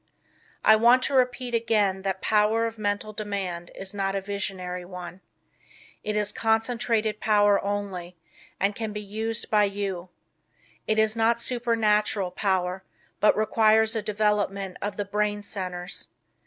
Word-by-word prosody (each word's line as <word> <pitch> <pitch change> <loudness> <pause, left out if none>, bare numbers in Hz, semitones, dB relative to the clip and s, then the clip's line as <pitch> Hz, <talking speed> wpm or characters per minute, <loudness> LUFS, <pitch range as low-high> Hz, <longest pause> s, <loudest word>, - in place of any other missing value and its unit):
I 220 - +8
want 240 +3 +5
to - - -1
repeat 250 -1 +1
again 215 -4 +1
that 190 -1 -3
Power 220 +1 +3
of 225 -1 -5
Mental 205 +1 -2
Demand 195 -5 -4
is 195 +1 -5
not 195 -1 -1
a - - +1
visionary 190 -2 -4
one. 180 0 -9 0.8
It 210 0 -2
is 210 -1 +1
concentrated 225 -1 0
power 205 -2 +3
only, 195 -3 -4 0.4
and 200 +2 +2
can 220 -2 -4
be 210 - -4
used 220 +3 -4
by 210 -1 +5
you. 195 -3 -4 0.8
It 215 - +1
is 220 0 +3
not 230 +1 +2
supernatural 220 -5 +1
power, 190 -1 -1 0.4
but 210 - +4
requires 220 +1 +3
a 220 - 0
development 205 -2 0
of 205 0 -3
the 205 - -2
brain 210 +1 -1
centers. 180 -2 -5
210 Hz, 140 wpm, -26 LUFS, 195-220 Hz, 0.8 s, I